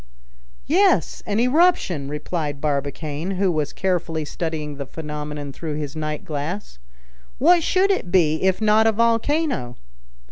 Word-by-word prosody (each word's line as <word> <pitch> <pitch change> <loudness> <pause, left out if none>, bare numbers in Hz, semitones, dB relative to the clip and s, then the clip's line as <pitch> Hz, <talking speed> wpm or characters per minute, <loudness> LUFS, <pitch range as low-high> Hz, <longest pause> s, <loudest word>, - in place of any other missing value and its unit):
"Yes, 380 +6 +2
an 205 +1 0
eruption," 250 - +2
replied 150 -1 -3
Barbicane, 150 +4 -2
who 190 -1 +2
was 155 -3 -1
carefully 170 -4 -1
studying 150 -2 -4
the 140 -2 -5
phenomenon 150 -2 -6
through 155 0 -5
his 150 -1 -5
night 155 -1 -4
glass. 150 - -5 0.6
"What 340 +5 +5
should 380 +4 +2
it 190 - -2
be, 160 -4 +3
if 190 0 +2
not 215 +1 +4
a - - +5
volcano?" 230 - +1
160 Hz, 135 wpm, -22 LUFS, 150-220 Hz, 0.6 s, What